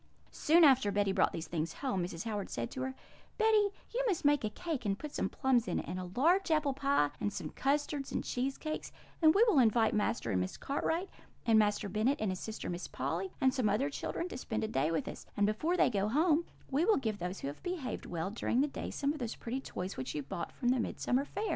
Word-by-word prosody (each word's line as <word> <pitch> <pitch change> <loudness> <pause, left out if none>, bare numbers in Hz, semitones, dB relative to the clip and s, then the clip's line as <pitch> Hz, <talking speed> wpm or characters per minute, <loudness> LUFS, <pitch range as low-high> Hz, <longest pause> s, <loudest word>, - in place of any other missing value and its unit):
Soon 330 +3 +4
after 260 -8 +6
Betty 200 0 +2
brought - - +3
these 165 - -5
things 160 -1 -2
home, 250 -10 -2
Mrs. 170 -1 -5
Howard 210 -3 -3
said 115 -1 -3
to 260 - -5
her: 260 0 -3 0.4
'Betty, 435 -2 +4 0.2
you - - 0
must 365 -8 0
make 290 -2 +4
a 215 - 0
cake 320 +3 -4
and 200 -2 0
put 300 +3 -7
some - - -1
plums 255 -4 +2
in - - 0
it, - - -3
and 180 +2 -3
a 180 -1 -5
large 350 +7 +4
apple 305 -3 +2
pie, 275 - +2
and 205 - -1
some - - -5
custards 285 0 -1
and - - -1
cheesecakes; 275 +5 -3 0.3
and 315 +1 +6
we 420 - +7
will 390 -11 +5
invite 225 -2 +4
Master 210 - 0
and 90 -2 +1
Miss 90 - -4
Cartwright, 325 +6 -1 0.4
and 225 -2 +5
Master 205 -1 +2
Bennet 225 +8 +1
and 215 -3 0
his 185 - -4
sister 220 0 -5
Miss 175 0 -4
Polly, 165 +8 -3
and 260 -1 +3
some 250 -5 +1
other 200 -8 +1
children, 340 - -3
to - - -6
spend 220 -4 -3
a - - 0
day 150 -7 +1
with 165 -1 -1
us; - - -8
and 205 - +4
before 310 - 0
they - - +4
go 200 -2 +1
home, 310 +7 +3 0.3
we 280 +4 +2
will 435 +4 +4
give 220 -6 -2
those 180 +2 -4
who - - -3
have 145 - -7
behaved 355 -8 -4
well 170 +2 -3
during 235 +3 +1
the 290 - +2
day 280 - -5
some 285 +1 -1
of 305 - -7
those 235 -3 -3
pretty 250 +3 -4
toys 185 -6 -5
which 130 +1 -4
you 150 - -2
brought 170 +5 -5
from 245 - -1
the 255 0 +3
Midsummer 255 +3 0
Fair.' 405 +8 -5
240 Hz, 245 wpm, -33 LUFS, 195-290 Hz, 0.4 s, we